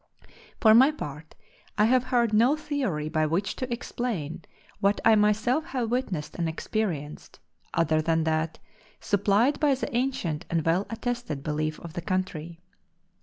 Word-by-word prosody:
For 220 -1 +6
my 260 +5 +7
part 155 - -7 0.4
I 210 - +5
have 255 +2 +3
heard 240 -3 +1
no 240 +7 +5
theory 270 - -2
by 155 0 +1
which 175 +6 -1
to 255 -1 -4
explain 230 -9 -3 0.4
what 200 0 +2
I 225 - +7
myself 215 +7 +2
have 250 -8 -3
witnessed 190 -12 -2
and 170 -2 0
experienced, 160 -4 -4 0.4
other 160 -2 +2
than 165 0 +1
that 160 0 -1 0.4
supplied 205 +7 +2
by 290 -3 +3
the 255 - -4
ancient 190 - -1
and 165 -2 0
well 175 +5 +1
attested 230 - -4
belief 155 0 -2
of 170 -2 -9
the 175 - -4
country. 170 -3 -3
200 Hz, 150 wpm, -27 LUFS, 160-240 Hz, 0.4 s, my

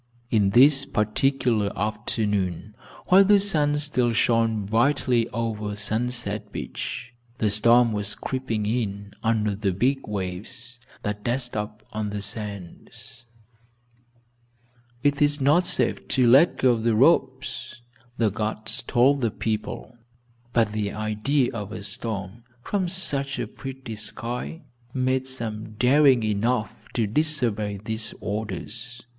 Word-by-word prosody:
On 105 -3 +4
this 135 +6 +6
particular 115 -2 +1
afternoon, 105 -2 -2 0.4
while 190 +2 +8
the 200 +1 +5
sun 150 -7 +1
still 130 -5 +1
shone 115 -2 +2
brightly 120 +2 +2
over 110 -3 -3
Sunset 105 -1 -1
Beach, 125 - -6 0.2
the 105 -4 +1
storm 115 +3 +4
was 105 -1 -1
creeping 120 -5 -3
in 100 -3 -2
under 110 -3 +1
the 100 -1 -1
big 130 +9 0
waves 105 +6 -6 0.2
that 105 0 -3
dashed 125 +1 -2
up 105 0 -5
on 105 -1 -2
the 100 -1 -4
sands. 105 0 -7 1.8
"It 145 +1 +2
is 145 0 +3
not 150 +6 +3
safe - - +1
to 130 -2 +2
let 135 +8 +6
go 125 -2 +3
the 115 0 +1
ropes," 120 +2 +1 0.4
the 110 -3 +2
guards 110 +1 -3
told 135 +3 +3
the 115 - +2
people, 110 +3 -4 0.5
but 115 -3 +2
the 105 -1 -2
idea 110 +6 0
of 105 -3 -5
a 110 - -6
storm, 105 0 -5 0.2
from 195 -3 -1
such 140 -7 0
a - - -2
pretty 130 -4 -8
sky, 120 - -4 0.3
made 130 0 0
some 110 -4 -5
daring 130 +2 +4
enough 110 +1 0 0.2
to 115 - +2
disobey 110 -5 0
these 110 0 -1
orders. 110 +4 -5
115 Hz, 125 wpm, -25 LUFS, 105-130 Hz, 1.8 s, while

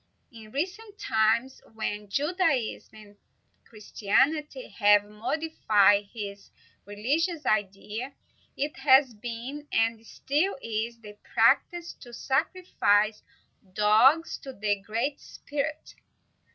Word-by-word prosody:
In 220 -3 -13
recent 390 - -4
times, 230 - +1
when 210 -2 -4
Judaism 295 - 0
and 210 -1 -15 0.5
Christianity 285 - 0
have 205 -1 +4
modified 210 -3 +2
his 200 -3 -8 0.4
religious 295 - -1
ideas, 210 +4 -2 0.5
it 290 +2 -3
has 265 -2 +5
been, 240 +7 -7
and 225 0 +1
still 295 - -1
is, 230 0 -4
the 210 -1 -13 0.2
practice 345 -1 +2
to 240 - -12
sacrifice 220 - +1 0.5
dogs 235 - +4
to 270 - -9
the 205 -3 -1
Great 230 +8 -2
Spirit. 300 +2 -5
235 Hz, 100 wpm, -27 LUFS, 210-295 Hz, 0.5 s, has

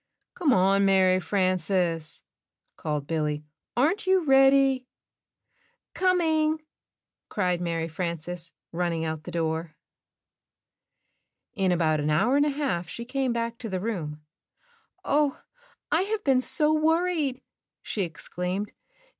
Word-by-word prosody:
"Come 325 -6 +1
on, 195 -1 +4
Mary 190 -1 +4
Frances," 185 -4 0 0.5
called 150 -2 -3
Billy, 150 -1 -1 0.3
"aren't 340 - +2
you 375 -1 +4
ready?" 270 -1 +5 1.1
"Coming," 320 -4 +2 0.7
cried 180 -3 0
Mary 165 -1 -1
Frances, 170 0 -4 0.2
running 170 -1 -1
out 160 -1 -4
the - - -6
door. 160 -1 -2 1.8
you: 195 -5 -1
In 185 - +3
about 160 -3 +2
an 150 +1 -1
hour 210 - +3
and 290 +1 +4
a - - +2
half 270 - -2
she 235 - -6
came 265 0 -1
back 235 0 -2
to 225 - -5
the 190 -1 -2
room. 165 -8 -4 0.8
"Oh, 290 -1 +2 0.5
I - - +3
have 420 +2 -2
been 265 -2 +3
so 300 +3 +1
worried!" 315 -3 +1 0.4
she 210 - -3
exclaimed. 180 +4 -4
195 Hz, 120 wpm, -26 LUFS, 165-275 Hz, 1.8 s, ready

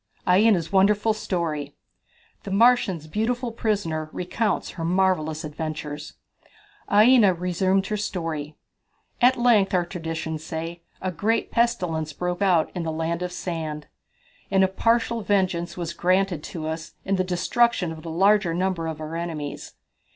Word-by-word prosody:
Aina's 185 -2 +4
Wonderful 205 +3 +3
Story. 160 -8 -3 0.7
The - - -8
Martians' 200 -6 +3
Beautiful 235 +8 -1
Prisoner 195 -9 -2
Recounts 190 +2 -2
Her 165 - -6
Marvellous 170 -3 +1
Adventures. 150 -1 -5 0.8
Aina 210 -2 +6
resumed 185 +2 +1
her 210 +1 -2
story. 165 -7 -4 0.7
"At 255 +2 +5
length, 225 -6 +3
our 175 -1 +2
traditions 160 -3 -5
say, 165 +1 -5 0.2
a 185 - -1
great 210 +7 0
pestilence 175 -10 0
broke 180 +4 -3
out 180 -5 +3
in 180 - -3
the 165 -1 -2
Land 165 +2 -2
of 180 0 -3
Sand, 160 -4 -4 0.6
and 195 -1 +4
a - - +5
partial 230 +3 +1
vengeance 185 -4 0
was 170 -1 -4
granted 185 -1 +1
to 155 -2 -5
us 160 +1 -5
in 195 0 +1
the 185 - +2
destruction 185 +1 +1
of 160 -1 -8
the 165 - -7
larger 190 +1 +3
number 180 -2 -1
of 160 -1 -5
our 155 +1 -6
enemies. 160 -4 -5
180 Hz, 145 wpm, -24 LUFS, 160-200 Hz, 0.8 s, Aina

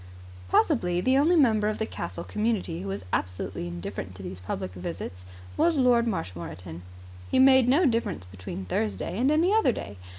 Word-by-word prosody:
Possibly 180 - +2
the 260 +8 +2
only 325 +5 +4
member 220 -9 +4
of 215 - -3
the 220 - -1
castle 90 - -5
community 210 - -1
who 100 - -6
was 95 0 -4
absolutely 90 -1 -2
indifferent 90 +2 -6
to 95 - -9
these 90 - -6
public 90 0 -5
visits 90 0 -6 0.3
was 335 -2 +2
Lord 245 -3 +4
Marshmoreton. 90 - -5 0.5
He - - +1
made 260 -1 +6
no 295 +8 +4
difference 225 - 0
between 95 0 -7
Thursday 105 - -2
and 260 +3 +3
any 330 +6 +3
other 440 - +4
day. 100 - -7
180 Hz, 170 wpm, -27 LUFS, -, 0.5 s, made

